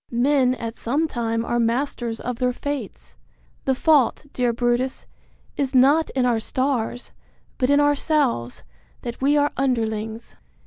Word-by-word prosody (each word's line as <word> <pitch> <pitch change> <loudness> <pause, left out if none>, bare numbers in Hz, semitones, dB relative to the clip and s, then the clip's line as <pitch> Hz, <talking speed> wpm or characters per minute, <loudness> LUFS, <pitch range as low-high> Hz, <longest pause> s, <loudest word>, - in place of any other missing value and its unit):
Men 255 +1 +2
at 230 -2 -6
some 290 +7 0
time 230 -4 -2
are 240 - 0
masters 235 -1 -1
of 245 -1 -4
their 250 -1 +1
fates: 230 - -6 0.5
The 265 - +2
fault, 290 -1 +3
dear 245 -1 +1
Brutus, 240 +2 -1 0.5
is 270 -1 -1
not 285 +5 +5
in 255 -2 +2
our 240 -2 +2
stars, 245 0 -2 0.5
but 255 - +1
in 285 0 +5
ourselves, 290 - +1 0.4
that 240 0 -6
we 285 +2 +3
are 290 0 +2
underlings. 225 -3 -2
250 Hz, 140 wpm, -23 LUFS, 230-280 Hz, 0.5 s, not